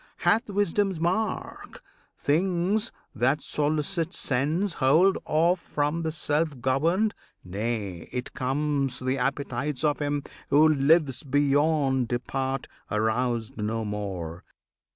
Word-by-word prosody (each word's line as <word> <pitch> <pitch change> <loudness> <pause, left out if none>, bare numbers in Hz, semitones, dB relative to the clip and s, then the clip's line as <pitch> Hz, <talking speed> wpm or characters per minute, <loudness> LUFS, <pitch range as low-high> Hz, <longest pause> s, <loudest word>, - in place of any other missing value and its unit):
Hath 230 +1 +2
wisdom's 200 -2 +1
mark! 185 +6 -2 0.3
Things 185 +7 +1 0.2
that 130 +6 +2
solicit 155 +4 -1
sense 155 +9 0
Hold 160 +9 +5
off 170 +4 +2
from 150 0 -1
the 160 -1 -1
self 155 -2 -1
governed; 165 - +1 0.3
nay, 100 -2 -4
it 125 0 -4
comes, 135 0 -1
The 130 +1 -1
appetites 135 +1 -2
of 150 -1 +2
him 145 -1 -1 0.3
who 150 +2 +6
lives 150 -1 +3
beyond 145 -2 +2
Depart, 130 +2 -2 0.2
aroused 110 +1 0
no 110 +1 -2
more. 95 -5 -5
145 Hz, 110 wpm, -26 LUFS, 125-165 Hz, 0.3 s, who